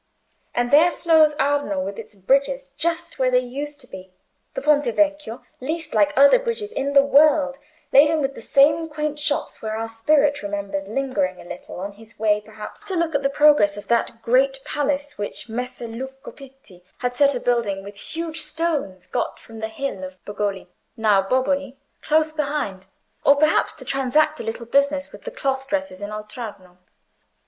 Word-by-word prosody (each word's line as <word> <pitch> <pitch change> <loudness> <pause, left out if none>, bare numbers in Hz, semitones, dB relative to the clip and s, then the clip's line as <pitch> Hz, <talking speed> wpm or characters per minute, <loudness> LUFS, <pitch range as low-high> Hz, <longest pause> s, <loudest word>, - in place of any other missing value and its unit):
And 245 0 0
there 310 +4 +7
flows 320 -3 +4
Arno, 285 -8 0
with 195 +2 -4
its 215 -1 -10
bridges 270 +6 0
just 335 +2 -2
where 260 -1 +3
they 250 - +3
used 280 +4 -4
to 250 - -15
be—the 190 - -11
Ponte 295 -1 +4
Vecchio, 280 -2 0 0.2
least 310 +4 -4
like 300 -1 +3
other 280 - +7
bridges 460 -3 -3
in 280 -9 -2
the 275 -1 +7
world, 280 -1 +4 0.3
laden 300 +3 +6
with 275 -1 -1
the - - -10
same 305 +4 +3
quaint 300 -1 -3
shops 295 0 -2
where 220 0 -3
our 225 0 -3
Spirit 285 +6 +2
remembers 200 -1 -4
lingering 205 -7 -1
a - - -10
little 175 0 -9
on 200 +2 -5
his 220 +2 -18
way 210 -1 +2
perhaps 215 0 -10
to 385 - -4
look 335 -2 0
at 285 - +1
the 275 - +1
progress 280 -9 +4
of 205 - -10
that 230 -1 0
great 270 +3 +3
palace 290 -1 -2
which 205 +3 -5
Messer 245 +1 -5
Luca 265 +4 -8
Pitti 270 -10 -16
had 245 0 -2
set 280 +1 +4
a - - -1
building 225 -6 0
with 200 +1 -10 0.2
huge 330 -1 -3
stones 300 - -2
got - - -3
from 225 -1 -12
the 220 - -2
Hill 220 -4 -5
of 185 0 -8
Bogoli 205 -2 -3 0.3
(now 210 -3 +4
Boboli) 265 +5 0 0.2
close 310 0 +2
behind, 280 -11 -3 0.4
or 280 - +6
perhaps 305 +2 +3
to - - -13
transact 300 +4 +1
a - - -4
little 225 +1 -5
business 280 +3 +1
with - - -13
the - - -3
cloth 270 - -2
dressers 285 -9 -3
in 205 - -4
Oltrarno. 210 -4 -8
270 Hz, 180 wpm, -22 LUFS, 215-295 Hz, 0.4 s, there